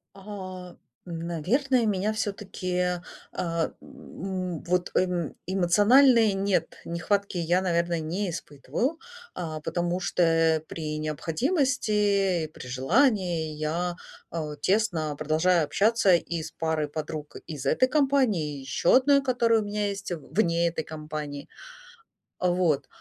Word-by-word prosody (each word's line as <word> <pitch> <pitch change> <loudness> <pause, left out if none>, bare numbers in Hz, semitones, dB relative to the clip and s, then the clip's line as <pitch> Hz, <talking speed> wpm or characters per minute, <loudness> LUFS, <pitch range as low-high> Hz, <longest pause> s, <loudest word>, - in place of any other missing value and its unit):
А 185 -3 -8 0.3
наверное, 180 - 0
меня 205 +1 0
всё-таки, 185 -4 -2 0.3
а, 165 -2 -1
м, 185 -3 -6
вот 180 0 0
эм 180 -4 0
эмоциональной 210 +5 +5
нет, 195 -4 0
нехватки 195 +3 -1
я, 175 +2 +2
наверное, 170 -2 0
не 180 +5 -2
испытываю. 165 - -3 0.3
А 155 -3 -5
потому 175 +3 -1
что, 180 - -1
э, 165 -1 +3
при 155 -1 -5
необходимости 200 - +1
и 155 - -3
при 150 - -11
желании 170 - +1
я, 165 +4 -2 0.3
а, 155 -3 -4
тесно 170 -4 0
продолжаю 160 +3 +2
общаться 210 +3 +3
и 170 -1 0
с 160 - -7
парой 160 -2 -1
подруг 150 0 -6
из 150 -5 -6
этой 255 - +3
компании, 255 - +1
и - - -7
ещё 135 +5 +1
одной, 280 +1 +5
которая 235 -3 +2
у - - -3
меня 205 0 -1
есть 200 -2 -5
в 155 -5 -7
вне 170 -4 +3
этой 165 -1 -2
компании. 150 -2 -6 0.9
Вот, 175 -5 +1
180 Hz, 125 wpm, -27 LUFS, 160-205 Hz, 0.9 s, эмоциональной